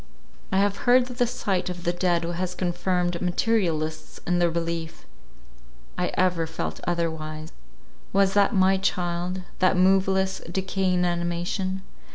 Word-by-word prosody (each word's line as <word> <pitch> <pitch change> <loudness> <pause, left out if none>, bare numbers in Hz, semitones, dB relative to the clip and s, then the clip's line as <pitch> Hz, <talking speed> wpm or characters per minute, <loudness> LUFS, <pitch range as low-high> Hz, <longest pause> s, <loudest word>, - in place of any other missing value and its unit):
I 190 - +2
have 200 0 +2
heard 250 0 +6
that 250 0 -9
the 245 - +3
sight 200 -7 -1
of 175 -1 -6
the 175 - +1
dead 175 -1 +1
has 175 +2 -3
confirmed 175 -1 -1
materialists 175 -5 -1
in 175 0 +1
their 175 -1 +3
belief. 165 -1 -4 0.9
I - - 0
ever 180 -3 +1
felt 160 - -4
otherwise. 160 -2 -2 0.6
Was 195 0 +3
that 200 -1 +4
my 190 0 +4
child—that 180 0 -1
moveless 190 +1 +3
decaying 190 0 0
inanimation? 175 +2 -1
180 Hz, 130 wpm, -25 LUFS, 170-190 Hz, 0.9 s, heard